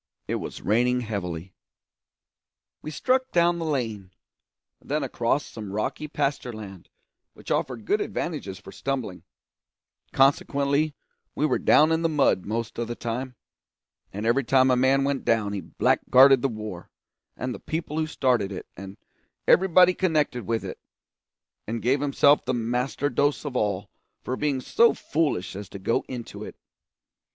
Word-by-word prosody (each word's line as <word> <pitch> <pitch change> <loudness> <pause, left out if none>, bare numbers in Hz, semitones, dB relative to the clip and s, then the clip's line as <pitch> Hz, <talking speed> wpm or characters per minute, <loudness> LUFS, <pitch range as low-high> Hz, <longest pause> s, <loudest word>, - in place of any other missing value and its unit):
It - - -1
was - - -7
raining 125 +4 +2
heavily. 95 -5 -5 1.3
We - - -6
struck 255 - 0
down 170 0 +3
the 165 - -3
lane, 115 -10 -2 0.7
then 150 +1 -2
across 130 +2 0
some 105 -3 -8
rocky 105 +9 -3
pasture 140 -4 -2
land 100 -5 -10 0.5
which - - -9
offered 120 -5 -1
good 210 - +1
advantages 140 - -4
for 95 - -12
stumbling; 125 -10 -4 0.9
consequently 140 +2 +2 0.4
we 150 - +1
were - - +1
down 155 +1 +5
in 160 0 +2
the 165 - +1
mud 140 - +2
most 115 +2 -3
of 120 - -2
the 120 - -4
time, 125 +3 -4 0.8
and 105 +3 -5
every 120 +5 +2
time 130 +1 +4
a - - +4
man 130 +2 +3
went 140 -1 -1
down 105 -3 +1
he 100 - -3
blackguarded 135 0 +4
the 135 - +1
war, 110 -6 -7 0.5
and 125 0 -3
the - - -8
people 160 -1 -4
who 155 - 0
started 125 -9 +1
it, 95 - -6
and 95 +2 -9 0.5
everybody 185 -1 +6
connected 155 - 0
with 115 -1 -1
it, - - -7 0.9
and 115 +2 -2
gave 130 +5 +1
himself 145 0 +4
the 130 - -1
master 125 +4 -1
dose 145 +3 0
of 140 -3 -5
all 100 -3 -1 0.3
for 130 - -2
being 140 -2 -1
so 235 - +4
foolish 145 - -1
as 100 -1 -7
to - - -8
go 100 +4 0
into 120 -3 -7
it. - - -9
130 Hz, 155 wpm, -25 LUFS, 110-145 Hz, 1.3 s, everybody